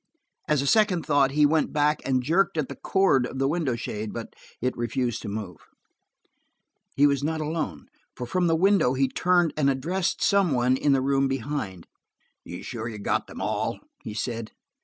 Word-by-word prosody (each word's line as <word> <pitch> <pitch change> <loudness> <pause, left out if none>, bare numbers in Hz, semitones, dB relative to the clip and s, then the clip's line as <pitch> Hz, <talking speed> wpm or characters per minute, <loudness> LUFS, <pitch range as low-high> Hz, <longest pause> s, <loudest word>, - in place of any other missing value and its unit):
As 150 -3 +2
a - - -3
second 190 0 +3
thought, 145 -3 +3
he 150 +2 +3
went 155 +2 +2
back 150 0 +1
and 130 -2 +1
jerked 170 +5 +1
at 150 -4 -1
the - - -6
cord 185 -10 +2
of 135 - -8
the 135 0 +1
window 150 -5 0
shade, 105 -2 -5
but 115 -1 -7 0.3
it 125 +1 -1
refused 120 0 -2
to - - -6
move. 100 -3 -5 1.4
He 145 - +5
was 140 -1 +2
not 160 +1 -1
alone, 150 - -3 0.3
for 125 - -5
from 175 +8 0
the 165 - +3
window 185 -6 +3
he 135 +1 +2
turned 175 +4 +2
and 145 -2 +2
addressed 170 +8 -1
some 195 -6 +3
one 125 +1 +2
in 140 +2 +2
the 135 - +2
room 135 0 +2
behind. 135 - -4 0.6
"You 90 - -8
are - - -7
are - - -12
sure 115 -2 -5
you 110 - -7
got 100 - -1
them - - -9
all?" - - -2 0.2
he 105 - -7
said. 115 0 -4
135 Hz, 200 wpm, -25 LUFS, 120-160 Hz, 1.4 s, He